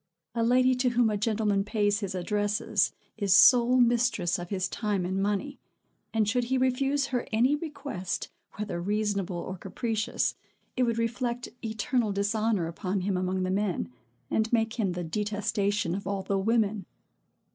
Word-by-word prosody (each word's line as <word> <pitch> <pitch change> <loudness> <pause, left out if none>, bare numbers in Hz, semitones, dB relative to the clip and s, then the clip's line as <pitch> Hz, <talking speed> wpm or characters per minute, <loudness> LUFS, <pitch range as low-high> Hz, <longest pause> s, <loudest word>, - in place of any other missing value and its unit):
A 230 - -1
lady 255 +2 +4
to 250 0 +2
whom 240 -2 +2
a - - 0
gentleman 210 -1 +1
pays 205 -1 +1
his 200 -3 -4
addresses, 205 +2 0 0.3
is 200 -3 +3
sole 240 +5 +7
mistress 240 -8 +2
of 175 0 -7
his 185 -2 -1
time 205 -3 -2
and 190 +2 -1
money; 205 +8 -2 0.5
and, 220 -2 +1
should 245 +2 +1
he 260 +2 0
refuse 270 +2 +1
her 245 - -1
any 245 +6 +3
request, 285 - -5 0.2
whether 205 -5 -4
reasonable 200 -2 -1
or 185 +2 -5
capricious, 215 +3 -1 0.4
it 255 - +2
would 230 -1 0
reflect 240 +1 -2
eternal 220 +1 0
dishonor 205 -1 0
upon 185 +3 -3
him 195 +1 -1
among 185 0 -1
the 185 - -1
men, 195 -7 -1 0.4
and 220 0 +1
make 225 0 +1
him 195 -5 +1
the 180 0 -4
detestation 205 0 -1
of 195 +1 -4
all 195 -1 -2
the 195 +1 0
women. 210 -2 +1
210 Hz, 160 wpm, -28 LUFS, 195-235 Hz, 0.5 s, sole